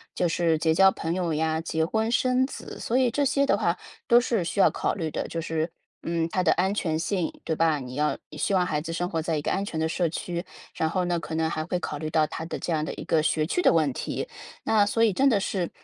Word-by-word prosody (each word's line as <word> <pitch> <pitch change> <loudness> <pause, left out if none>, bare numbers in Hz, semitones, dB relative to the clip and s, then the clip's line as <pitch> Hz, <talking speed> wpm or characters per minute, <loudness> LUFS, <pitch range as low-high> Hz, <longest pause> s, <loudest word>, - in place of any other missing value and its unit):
就 175 - +1
是 165 -1 +2
结 160 0 +2
交 190 +3 +6
朋 165 -2 -3
友 175 -3 -1
呀， 160 +1 0
结 160 -1 -1
婚 220 +5 0
生 255 +2 +2
子， - - -9
所 240 - 0
以 255 -2 +3
这 285 +3 +1
些 275 +1 +2
的 - - +3
话 - - +1 0.3
都 240 0 +6
是 230 -7 0
需 195 +4 +1
要 - - +7
考 - - -1
虑 160 -5 -3
的， - - -3
就 165 - -4
是， 160 0 -2 0.3
嗯， 165 -1 0
它 185 - 0
的 170 - +4
安 190 +3 +1
全 160 -6 -1
性， 175 +1 -2
对 160 - -1
吧？ 160 -2 +2
你 125 -1 -8
要 150 +2 +1 0.2
希 155 - 0
望 185 -2 +3
孩 155 -4 -1
子 165 +2 -5
生 175 +2 -1
活 165 -3 -1
在 160 -1 -1
一 - - -2
个 - - -1
安 195 +1 0
全 170 - -5
的 160 0 0
社 175 +1 +1
区， 175 +1 -4 0.3
然 160 - 0
后 180 +2 0
呢 175 -1 0
可 160 0 -6
能 160 0 +1
还 155 -1 -3
会 180 +1 -1
考 150 - -4
虑 155 +1 -4
到 155 0 +3
它 160 - -6
的 165 - -4
这 - - -3
样 155 -1 0
的 - - -4
一 - - -7
个 160 - +2
学 155 0 +1
区 355 - 0
的 - - +5
问 155 -4 +3
题。 - - -4 0.4
那 215 -2 +4
所 225 +2 +1
以 220 - +5
真 270 +9 +3
的 225 -7 +4
是 190 -3 -2
170 Hz, 295 characters per minute, -26 LUFS, 160-195 Hz, 0.4 s, 要